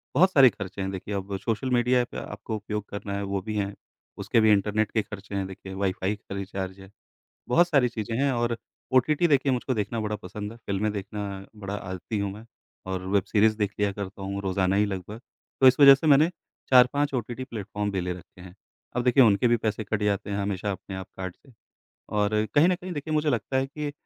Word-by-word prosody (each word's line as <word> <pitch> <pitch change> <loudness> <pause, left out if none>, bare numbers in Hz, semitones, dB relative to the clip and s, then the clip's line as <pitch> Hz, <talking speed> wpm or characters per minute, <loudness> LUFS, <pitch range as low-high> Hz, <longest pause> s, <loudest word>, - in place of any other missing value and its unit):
बहुत 185 +7 +5
सारे 135 -6 +8
खर्चे 100 -3 -7
हैं। 95 - -2
देखिए 95 +2 -5
अब 100 0 -3
सोशल 115 +4 -2
मीडिया 125 +1 +3
ऐप 120 - -6
आपको 110 - -5
उपयोग 105 0 -4
करना 100 0 -5
है 100 - -3
वो 100 0 -2
भी 110 +2 -5
हैं। 100 0 -1 0.5
उसके - - +2
भी 110 0 +5
इंटरनेट 105 +1 +2
के 110 - +2
खर्चे 100 -1 -8
हैं 100 -1 -1
देखिए 95 0 -9
वाई-फ़ाई 95 +1 -1
का 100 -1 -9
रिचार्ज 95 -1 -5
है। 95 0 -13 0.6
बहुत 175 +8 +4
सारी 140 -7 +3
चीजें 115 -1 -4
हैं 140 - +3
और 120 -1 0 0.4
ओ 130 - +7
टी 150 +5 0
टी 175 +4 +2
देखिए 140 -2 +3
मुझको 130 +1 -1
देखना 110 +1 -2
बड़ा 105 0 -2
पसंद 105 +2 -7
है, 115 - -13
फिल्में 100 +2 0
देखना 100 -1 -5
बड़ा 100 -1 -5
आदती 95 +2 -5
हूँ 100 -1 -2
मैं, 105 +3 -11 0.4
और 95 -1 -3
वेब 100 0 +2
सीरीज़ 110 0 +3
देख 105 -1 0
लिया 100 -1 +2
करता 100 0 -7
हूँ 100 +1 -3
रोज़ाना 95 0 +1
ही 105 - +4
लगभग। 100 +2 -6 0.4
तो 135 - +7
इस 130 - +4
वजह 140 -1 +11
से 140 +4 -3
मैंने 150 +3 +6 0.4
4-5 135 +3 +5
ओटीटी 125 +1 -3
प्लेटफ़ॉर्म 105 -3 -4
भी 95 -2 -1
ले 90 0 -2
रखे 90 +1 -12
हैं। 90 -1 -11 0.4
अब 125 - +1
देखिए 130 +2 +6
उनके 105 +1 +4
भी 120 - +4
पैसे 110 -1 -2
कट 110 0 -2
जाते 100 0 0
हैं 100 - -1
हमेशा 100 0 -2
अपने 95 0 -7
आप 95 -1 -6
कार्ड 95 -2 -5
से। 135 - -22 0.6
और 105 +1 +1
कहीं 150 +4 +6
न 180 - +3
कहीं 185 +1 -8
देखिए 155 0 -4
मुझे 150 0 +2
लगता 125 +1 -1
है 135 0 0
कि 150 +1 -5
105 Hz, 225 wpm, -26 LUFS, 100-125 Hz, 0.6 s, वजह